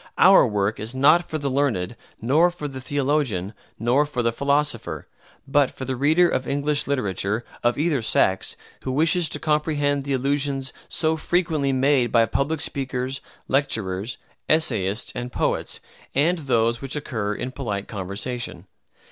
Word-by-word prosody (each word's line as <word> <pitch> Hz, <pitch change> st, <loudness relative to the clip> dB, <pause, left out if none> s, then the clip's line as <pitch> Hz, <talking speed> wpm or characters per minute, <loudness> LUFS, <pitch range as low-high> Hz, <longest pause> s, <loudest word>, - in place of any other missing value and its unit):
Our 190 Hz, -7 st, +7 dB
work 105 Hz, -1 st, -1 dB
is 110 Hz, +4 st, -4 dB
not 150 Hz, +6 st, +4 dB
for 155 Hz, -, -2 dB
the 140 Hz, -2 st, -3 dB
learned, 120 Hz, -8 st, 0 dB, 0.2 s
nor 150 Hz, +10 st, +4 dB
for 175 Hz, -4 st, -6 dB
the 135 Hz, -2 st, -7 dB
theologian, 130 Hz, -8 st, -1 dB, 0.2 s
nor 125 Hz, +6 st, +2 dB
for 125 Hz, -4 st, -2 dB
the 115 Hz, -, +2 dB
philosopher, 140 Hz, -2 st, -1 dB, 0.4 s
but 135 Hz, 0 st, +3 dB
for 130 Hz, -, -7 dB
the 130 Hz, 0 st, -2 dB
reader 155 Hz, +7 st, +4 dB
of 130 Hz, -6 st, -1 dB
English 145 Hz, +1 st, 0 dB
literature, 105 Hz, -4 st, -1 dB, 0.2 s
of 120 Hz, 0 st, +1 dB
either 150 Hz, -3 st, +1 dB
sex, 95 Hz, -3 st, +1 dB, 0.2 s
who 130 Hz, -, -3 dB
wishes 160 Hz, +4 st, +3 dB
to -, -, -2 dB
comprehend 150 Hz, -2 st, 0 dB
the 140 Hz, 0 st, -2 dB
allusions 135 Hz, 0 st, -1 dB, 0.2 s
so 160 Hz, 0 st, +1 dB
frequently 160 Hz, -4 st, 0 dB
made 130 Hz, -2 st, +2 dB
by 115 Hz, -1 st, +5 dB
public 145 Hz, +6 st, -1 dB
speakers, 130 Hz, -1 st, -3 dB, 0.3 s
lecturers, 110 Hz, -6 st, -1 dB, 0.3 s
essayists, 115 Hz, -8 st, +1 dB
and 125 Hz, 0 st, -5 dB
poets, -, -, -1 dB, 0.4 s
and 165 Hz, +6 st, +2 dB
those 120 Hz, -4 st, +1 dB
which 135 Hz, +1 st, -3 dB
occur 110 Hz, -8 st, -3 dB
in 125 Hz, -, -4 dB
polite 105 Hz, -7 st, -4 dB
conversation. 100 Hz, +1 st, -5 dB
135 Hz, 150 wpm, -23 LUFS, 115-145 Hz, 0.4 s, Our